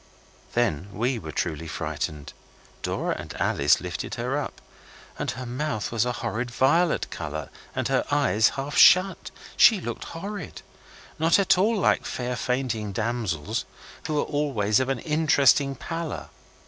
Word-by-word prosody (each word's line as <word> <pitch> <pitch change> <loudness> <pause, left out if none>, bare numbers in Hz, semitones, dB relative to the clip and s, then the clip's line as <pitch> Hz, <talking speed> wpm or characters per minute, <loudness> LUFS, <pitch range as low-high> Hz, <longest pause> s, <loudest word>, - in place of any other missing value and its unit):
Then 105 -7 0
we 120 +4 -1
were - - -7
truly 80 -1 -3
frightened. 75 -2 -4 0.5
Dora - - -1
and - - -8
Alice 70 +1 +3
lifted 90 -3 -5
her 125 +3 -2
up, 145 - -4 0.6
and - - -2
her 130 +1 -4
mouth 125 -3 -3
was 115 0 +1
a - - +1
horrid 120 +2 -2
violet 150 +8 +2
colour 75 0 -5 0.2
and - - 0
her - - +1
eyes 105 +5 +3
half 140 +1 -4
shut. 185 +2 +6 0.3
She 220 -4 +7
looked 120 -9 -5
horrid. 195 0 -7 0.6
Not 165 +2 +4
at 200 -2 +4
all 210 +5 +2
like 195 - +2
fair 125 0 -3
fainting 120 -5 -2
damsels, 105 -8 -2 0.4
who 155 -1 -1
are - - +2
always 130 -9 +1
of 130 0 -1
an 135 - 0
interesting 145 -2 +3
pallor. 165 0 -5
125 Hz, 150 wpm, -25 LUFS, 105-150 Hz, 0.6 s, She